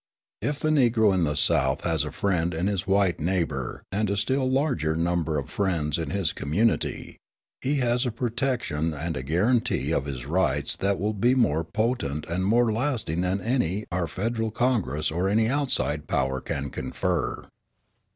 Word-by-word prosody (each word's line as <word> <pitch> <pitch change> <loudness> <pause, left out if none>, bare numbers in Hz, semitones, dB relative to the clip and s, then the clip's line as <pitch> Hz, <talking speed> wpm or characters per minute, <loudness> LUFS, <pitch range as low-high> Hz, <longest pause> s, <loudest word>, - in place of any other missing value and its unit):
If 145 -1 -1
the 155 - 0
Negro 115 -8 +4
in 90 -3 +2
the 75 -1 -1
South 65 +1 +2
has 80 -4 0
a 75 - -5
friend 90 -4 0
in 85 +3 -1
his 100 -2 -1
white 95 -2 +2
neighbour 85 +1 -2
and 105 +2 0
a 100 - 0
still 130 +6 +1
larger 130 - +1
number 85 -2 0
of 70 - -3
friends 85 -7 0
in 80 - -3
his 95 -5 0
community, 100 +11 -1 0.4
he 140 +3 0
has 120 -2 +1
a - - -1
protection 115 - -1
and 80 +2 -3
a 65 - -3
guarantee 95 - +1
of 70 - 0
his 65 -4 -5
rights 75 -3 0
that 100 0 0
will 105 +3 0
be 120 +5 +2
more 80 - +2
potent 80 - -1
and 90 +3 -1
more 115 +2 +3
lasting 115 - 0
than 95 +2 0
any 105 -4 0
our 85 -1 -1
Federal 110 +7 -2
Congress 105 - 0
or 90 +4 0
any 110 +2 +3
outside 125 - 0
power 65 0 0
can 70 -1 -4
confer. 85 +6 -2
95 Hz, 170 wpm, -26 LUFS, 80-115 Hz, 0.4 s, Negro